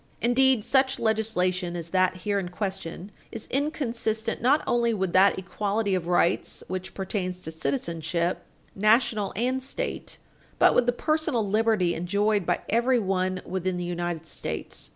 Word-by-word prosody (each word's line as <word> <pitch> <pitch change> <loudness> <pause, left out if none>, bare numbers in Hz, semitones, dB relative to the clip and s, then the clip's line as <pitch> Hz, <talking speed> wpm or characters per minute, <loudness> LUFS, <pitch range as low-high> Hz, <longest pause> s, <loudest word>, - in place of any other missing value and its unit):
Indeed, 250 -1 +4
such 265 +2 +2
legislation 185 -5 0
as 170 -1 -6
that 185 -1 +2
here 205 -1 +1
in 180 -2 -4
question 190 0 -5 0.2
is 225 - -7
inconsistent 235 -6 -1
not 275 +5 +3
only 235 -1 +1
with 190 -3 -2
that 195 +2 +5
equality 200 +2 -1
of 180 -2 -1
rights 175 -1 +1
which 185 0 -5
pertains 185 -2 -3
to 160 - -6
citizenship, 170 - -2 0.3
National 215 0 +2
and 255 +5 0
State, - - -4 0.4
but - - +5
with 245 - +3
the - - +5
personal 305 -4 0
liberty 210 -4 +2
enjoyed 200 +3 0
by 175 - +1
everyone 195 -6 +1
within 185 0 -2
the 175 - -3
United 175 -2 -3
States. - - -5
200 Hz, 145 wpm, -26 LUFS, 180-235 Hz, 0.4 s, that